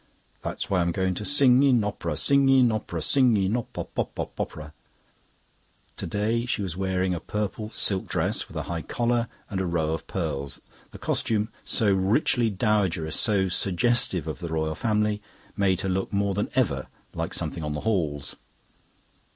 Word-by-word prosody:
"That's - - -3
why 95 -2 +2
I'm 85 0 +1
going 95 +1 0
to 100 - -5
Sing 135 0 +5
in 130 -5 +4
op'ra, 85 -7 -3
sing 140 -1 +4
in 130 -3 +6
op'ra, 90 -7 -3
Sing 125 -5 +4
in 95 +2 +1
op 120 - -3
pop - - -6
pop - - -2
pop - - -4
pop - - -2
popera." 75 0 -10 1.2
Today 110 +6 -1
she 120 -5 0
was 90 -3 -4
wearing 95 -1 0
a 85 - -2
purple 105 +4 -3
silk 95 -2 0
dress - - 0
with - - -9
a - - -1
high 85 -1 -3
collar 120 +3 0 0.2
and 95 -2 -2
a - - -1
row 80 -2 0
of 80 - -5
pearls. 70 -6 -3 0.3
The - - -11
costume, 110 -1 0
so 105 -3 +2
richly 110 +5 +3
dowagerish, 95 -6 +1
so 100 -1 +2
suggestive 95 -1 +1
of 80 - -4
the 85 - -4
Royal 80 -1 -1
Family, 105 +2 0 0.3
made 95 -3 +2
her 95 - -1
look 95 +1 -1
more 100 -1 +1
than 105 - -1
ever 75 - +1 0.3
like - - -3
something 80 - -3
on 75 0 -2
the 75 - -3
Halls. 75 -10 -1
100 Hz, 180 wpm, -26 LUFS, 85-110 Hz, 1.2 s, in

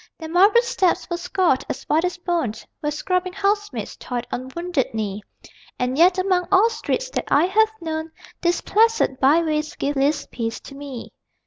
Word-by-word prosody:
Their 320 -1 -7
marble 400 +8 +5
steps 380 -7 +1
were 345 - 0
scoured 345 -5 +1
as - - -4
white 315 +2 +1
as 360 0 -1
bone 345 - -1 0.3
Where 295 - -2
scrubbing 365 +4 -1
housemaids 410 +1 -1
toiled 245 -1 -4
on 255 +1 -4
wounded 340 -9 -1
knee 210 -2 -3 0.6
And 250 +1 -1
yet, 355 +5 +5
among 370 -1 +1
all 405 +4 +5
streets - - -2
that - - -2
I 295 +4 +4
have 435 +4 +3
known 320 -1 -3 0.3
These 345 0 +1
placid 450 - +2
byways 305 +2 +2
give 285 +1 -2
least 285 +2 0
peace 230 -1 -3
to - - -11
me. 275 -4 -8
335 Hz, 175 wpm, -22 LUFS, 280-375 Hz, 0.6 s, marble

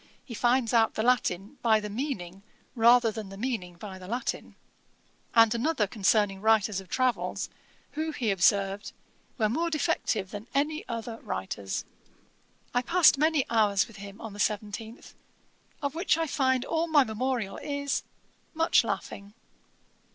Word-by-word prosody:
He 245 - -8
finds 240 +1 +1
out 225 -1 +3
the 220 - -1
Latin 240 -1 0
by 220 -2 +4
the 210 - -5
meaning 205 - -4 0.3
rather 235 0 +5
than 215 -2 -7
the 195 - -10
meaning 210 -7 -3
by 190 +1 -9
the 185 - -10
Latin.' 240 +4 -4 0.8
And 225 -1 +6
another 235 -1 +1
concerning 200 -1 +1
writers 215 -2 +3
of 190 - -17
travels, 255 -2 -1 0.4
who, 315 +1 -3
he 245 -8 -1
observed, 195 +1 +1 0.4
'were 220 -4 +2
more 325 +10 0
defective 285 - -1
than 205 +2 -7
any 305 +3 0
other 230 -1 -5
writers.' 95 +1 -4 0.9
I 245 - +2
passed 315 0 +5
many 310 -3 +3
hours 210 -4 +3
with 230 - -14
him 200 +1 -10
on 225 -2 -8
the 205 - -11
17th, 215 +2 -3 0.7
of 285 -1 -1
which 330 0 +1
I 330 - 0
find 260 -3 +1
all 330 +1 0
my 300 -4 +5
memorial 235 -2 -2
is, 285 -1 -2 0.5
'much 325 -4 +4
laughing.' 200 -1 -5
225 Hz, 150 wpm, -28 LUFS, 205-265 Hz, 0.9 s, And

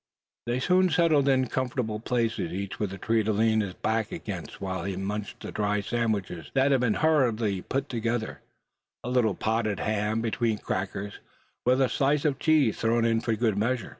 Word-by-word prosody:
They 120 +1 0
soon 185 +6 +3
settled 155 -4 +3
in 130 -1 +3
comfortable 125 -4 -2
places, 115 -7 -1
each 100 +2 -5
with 105 -3 -1
a 100 - -6
tree 115 +3 +1
to 110 - 0
lean 110 +1 +2
his 95 -3 -4
back 110 0 -1
against 100 - -6
while 95 -2 -3
he 100 0 -3
munched 100 +2 -4
the - - -6
dry 105 0 0
sandwiches 105 -6 -2
that 135 +1 +4
had 135 -2 +3
been 115 -4 +2
hurriedly 115 - +2
put 135 +7 -2
together, 115 -2 -2 0.6
a 125 - -4
little 120 -5 +2
potted 110 -3 -1
ham 110 +1 0
between 115 -1 0
crackers, 95 +1 -4 0.5
with 130 +1 +4
a 135 - +4
slice 140 +4 +1
of 140 -3 +1
cheese 150 -8 +3
thrown 115 0 +2
in 115 -1 +2
for 115 -1 0
good 110 -2 +1
measure. 120 +2 -1
115 Hz, 185 wpm, -27 LUFS, 105-130 Hz, 0.6 s, that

